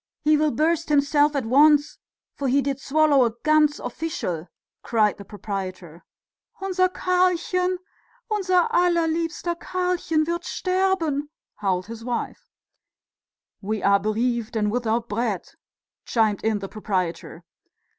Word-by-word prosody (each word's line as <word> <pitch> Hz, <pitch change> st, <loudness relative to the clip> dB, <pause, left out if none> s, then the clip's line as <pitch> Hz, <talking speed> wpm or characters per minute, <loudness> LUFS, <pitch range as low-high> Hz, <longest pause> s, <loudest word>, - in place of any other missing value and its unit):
He 305 Hz, 0 st, +4 dB
will 305 Hz, 0 st, +2 dB
burst 320 Hz, +2 st, 0 dB
himself 290 Hz, 0 st, +3 dB
at 270 Hz, -4 st, -1 dB
once, 290 Hz, +4 st, +4 dB, 0.3 s
for 280 Hz, -, -3 dB
he 275 Hz, +2 st, +2 dB
did 275 Hz, 0 st, -2 dB
swallow 290 Hz, -2 st, +3 dB
a 230 Hz, -2 st, 0 dB
ganz 305 Hz, -1 st, +3 dB
official!" 230 Hz, -, -4 dB, 0.3 s
cried 215 Hz, -3 st, +1 dB
the 200 Hz, -, -9 dB
proprietor. 185 Hz, -4 st, -6 dB, 0.6 s
"Unser 370 Hz, -1 st, +1 dB
Karlchen, 365 Hz, 0 st, +1 dB, 0.5 s
unser 370 Hz, -4 st, +2 dB
allerliebster 335 Hz, -1 st, +1 dB
Karlchen 360 Hz, -4 st, 0 dB
wird 340 Hz, +1 st, -2 dB
sterben," 365 Hz, -7 st, 0 dB, 0.3 s
howled 185 Hz, -3 st, -1 dB
his 225 Hz, +1 st, -9 dB
wife. 240 Hz, 0 st, -4 dB, 1.1 s
"We 215 Hz, +1 st, -3 dB
are 200 Hz, 0 st, +4 dB
bereaved 230 Hz, +2 st, -1 dB
and 210 Hz, -1 st, +1 dB
without 235 Hz, 0 st, -1 dB
bread!" 215 Hz, -3 st, -2 dB, 0.6 s
chimed 220 Hz, -4 st, +1 dB
in 220 Hz, -1 st, +1 dB
the 195 Hz, -1 st, -6 dB
proprietor. 185 Hz, -5 st, -4 dB
280 Hz, 120 wpm, -24 LUFS, 215-335 Hz, 1.1 s, He